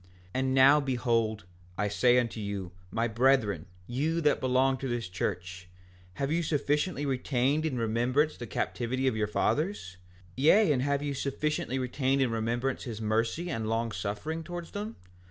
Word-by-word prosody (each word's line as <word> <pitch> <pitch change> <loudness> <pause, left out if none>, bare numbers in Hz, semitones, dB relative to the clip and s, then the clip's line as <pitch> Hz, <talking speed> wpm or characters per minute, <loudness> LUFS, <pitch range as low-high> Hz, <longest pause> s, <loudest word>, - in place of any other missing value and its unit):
5:6 90 - -26 0.3
And 130 0 0
now 135 +3 +7
behold, 115 -6 0 0.3
I 105 - +1
say 120 +4 +3
unto 120 -2 0
you, 100 -3 -4 0.2
my 115 +4 0
brethren, 110 - +2 0.2
you 150 - -1
that 150 -2 +3
belong 130 +1 +2
to 135 - -4
this 120 -4 -2
church, 90 0 -4 0.5
have 140 +1 -2
you 170 +2 +2
sufficiently 150 0 0
retained 135 +3 +1
in 130 -5 -3
remembrance 120 +7 +1
the 120 - -7
captivity 130 +4 -2
of 130 -4 +2
your 105 -1 0
fathers? 145 - -1 0.4
Yea, 160 +6 +5
and 130 -3 +2
have 140 +1 0
you 145 -1 -2
sufficiently 140 -1 -2
retained 130 +1 0
in 130 -3 +2
remembrance 120 +4 -1
his 115 -4 -5
mercy 115 +11 0
and 110 -4 -2
long 115 0 0
suffering 110 +12 -4
towards 175 +1 -7
them? 210 +2 -5
130 Hz, 165 wpm, -29 LUFS, 115-145 Hz, 0.5 s, now